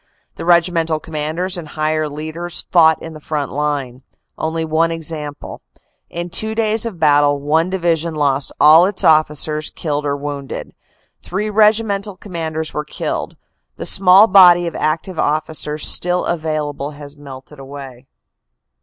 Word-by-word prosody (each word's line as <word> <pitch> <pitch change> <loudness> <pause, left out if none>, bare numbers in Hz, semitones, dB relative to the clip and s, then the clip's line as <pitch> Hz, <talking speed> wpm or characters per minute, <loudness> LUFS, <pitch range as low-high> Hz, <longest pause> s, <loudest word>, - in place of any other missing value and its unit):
The - - -8
regimental 170 -2 +2
commanders 160 +5 -3
and 160 - -9
higher 155 0 -2
leaders 160 +4 -4
fought 160 -3 +5
in 165 - -8
the 155 - -10
front 150 -2 -4
line. 140 -3 -3 0.3
Only 160 +1 -3
one 160 +1 +1
example: 155 -3 -6 0.5
In 175 +1 -6
two 220 +5 -3
days 220 0 +2
of 195 -7 -8
battle, 145 -1 +3
one 160 +5 0
division 170 -3 -1
lost 140 -2 0
all 160 +4 +7
its 200 -1 -3
officers, 155 -1 +2
killed 150 -2 -3
or 140 0 -1
wound 140 -2 -6
ed. - - -6 0.5
Three 210 +4 -4
regimental 210 -2 +1
commanders 160 -5 -5
were 150 - -3
killed. 150 - -5 0.4
The - - -6
small 190 +2 +6
body 180 -4 +6
of 170 - -5
active 160 +3 -2
officers 155 0 -1
still 180 0 +2
available 150 -3 -3
has 145 0 -10
melted 140 0 -12
away. 135 -2 -11
155 Hz, 145 wpm, -17 LUFS, 150-175 Hz, 0.5 s, all